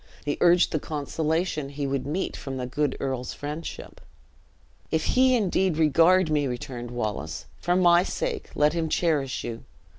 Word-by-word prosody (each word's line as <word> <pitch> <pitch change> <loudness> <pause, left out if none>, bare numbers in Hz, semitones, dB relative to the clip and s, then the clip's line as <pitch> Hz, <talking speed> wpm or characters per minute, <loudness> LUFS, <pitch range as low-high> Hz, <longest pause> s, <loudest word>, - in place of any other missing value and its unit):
He 145 - -2
urged 175 0 +5
the 155 - 0
consolation 155 +1 -2
he 140 0 -4
would 135 -1 -2
meet 175 +6 -2
from 135 -1 -6
the 125 - -3
good 140 +2 -1
earl's 130 -2 -3
friendship. 150 +3 -7 0.9
"If 160 -1 0
he 255 0 +5
indeed 190 -6 +1
regard 165 +3 +4
me," 145 -2 +2
returned 125 -1 -5
Wallace, 110 -4 -4
"for 175 - +1
my 175 -1 +5
sake 465 - -3
let 150 +1 +3
him 165 -2 -1
cherish 150 -7 0
you. 115 -1 -6
150 Hz, 155 wpm, -26 LUFS, 135-175 Hz, 0.9 s, urged